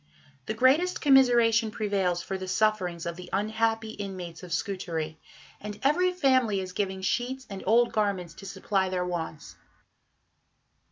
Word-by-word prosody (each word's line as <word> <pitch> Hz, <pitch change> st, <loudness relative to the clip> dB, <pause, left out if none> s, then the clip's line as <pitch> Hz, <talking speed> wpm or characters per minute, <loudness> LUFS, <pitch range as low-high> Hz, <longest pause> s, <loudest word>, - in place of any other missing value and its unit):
The 215 Hz, -, -2 dB
greatest 285 Hz, +10 st, +3 dB
commiseration 240 Hz, -5 st, +5 dB
prevails 195 Hz, -5 st, -1 dB
for 190 Hz, -, -4 dB
the 190 Hz, 0 st, -5 dB
sufferings 185 Hz, -4 st, 0 dB
of 170 Hz, 0 st, -4 dB
the 180 Hz, -, -9 dB
unhappy 220 Hz, +2 st, 0 dB
inmates 185 Hz, -5 st, -7 dB
of 180 Hz, -2 st, -10 dB
Scutari, 165 Hz, -4 st, -3 dB, 0.4 s
and 210 Hz, 0 st, -7 dB
every 355 Hz, +7 st, +3 dB
family 260 Hz, -, +2 dB
is 185 Hz, -1 st, -6 dB
giving 190 Hz, -1 st, -2 dB
sheets 255 Hz, +6 st, -1 dB
and 195 Hz, -, -6 dB
old 235 Hz, +3 st, +4 dB
garments 200 Hz, -5 st, -1 dB
to 195 Hz, -, -11 dB
supply 190 Hz, 0 st, -1 dB
their 180 Hz, -1 st, -1 dB
wants. 165 Hz, -4 st, -5 dB
200 Hz, 145 wpm, -27 LUFS, 185-230 Hz, 0.4 s, commiseration